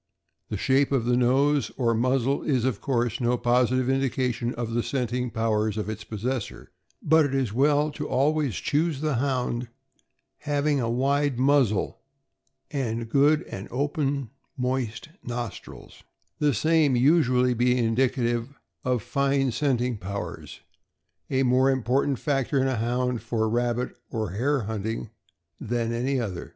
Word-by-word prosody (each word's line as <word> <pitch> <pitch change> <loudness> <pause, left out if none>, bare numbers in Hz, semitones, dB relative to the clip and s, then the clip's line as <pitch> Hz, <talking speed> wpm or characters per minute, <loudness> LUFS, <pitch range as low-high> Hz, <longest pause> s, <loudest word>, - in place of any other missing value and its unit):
The 105 - -3
shape 135 +6 +2
of 130 -4 +1
the 120 0 +2
nose 135 +2 +2
or 120 -3 +2
muzzle 130 +3 +1
is, 130 -5 0
of 130 -6 -1
course, 120 -2 -1
no 120 +1 +2
positive 125 +1 +2
indication 130 -2 0
of 115 -1 -4
the 120 +1 +1
scenting 125 -1 -2
powers 110 -2 0
of 105 0 -3
its 110 0 -7
possessor, 115 +2 -4 0.3
but 160 +1 +5
it 140 -2 -1
is 130 -6 0
well 145 +4 +3
to 150 0 -5
always 145 -1 +1
choose 155 -1 0
the 150 -5 0
Hound 125 -2 -1 0.7
having 145 -1 0
a 115 -2 -1
wide 140 +2 +1
muzzle 130 -6 +2 0.7
and 115 -5 -2
good 145 +4 +3 0.2
open 145 +3 -1
and 140 -4 -2 0.3
moist 125 -1 -2
nos 120 -3 -4
trils, - - -14 0.4
the 145 -4 +2
same 155 +2 +3
usually 125 -2 +3
being 125 +1 +2
indicative 120 +1 0 0.3
of 125 -4 0
fine 140 -1 +1
scenting 125 -3 0
powers, 100 +2 -6 0.7
a 135 0 +1
more 130 +1 +3
important 130 +1 +1
factor 140 -1 0
in 130 - +2
a 130 -2 0
Hound 125 +1 -1
for 110 -2 -1
rabbit 120 +2 -1
or 110 -5 -3
hare 135 +7 0
hunting 110 +1 -4 0.5
than 115 0 -2
any 130 +3 0
other. 100 -7 -4
125 Hz, 145 wpm, -26 LUFS, 115-140 Hz, 0.7 s, but